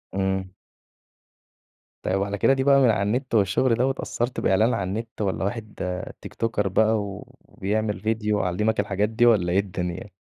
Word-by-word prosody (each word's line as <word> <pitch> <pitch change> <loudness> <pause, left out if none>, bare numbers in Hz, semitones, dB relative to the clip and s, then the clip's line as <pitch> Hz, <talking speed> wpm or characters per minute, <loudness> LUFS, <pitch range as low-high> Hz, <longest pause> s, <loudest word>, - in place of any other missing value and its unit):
امم. 95 -1 -1 1.5
طيب 95 +1 0
على 100 0 -3
كده 135 - +4
دي 135 -1 0
بقى 140 0 +5
من 125 - +5
على 105 -3 +2
النت 120 +4 -1
والشغل 105 +4 +3
ده 125 +3 +1
واتأثرت 125 -2 -2
بإعلان 110 +6 +3
عن 90 -2 -1
النت، 110 +2 -5
والّا 95 -2 -1
واحد 110 +1 -4 0.5
تيك - - -9
توكر 110 -3 -1
بقى 110 +4 +3
وبيعمل 105 +1 -4
ڤيديو 110 -1 0
علمك 105 +4 0
الحاجات 100 +1 0
دي؟ 120 +2 +2
والّا 100 -7 +4
إيه 95 - +4
الدنيا؟ 90 0 -4
105 Hz, 165 wpm, -24 LUFS, 95-115 Hz, 1.5 s, بقى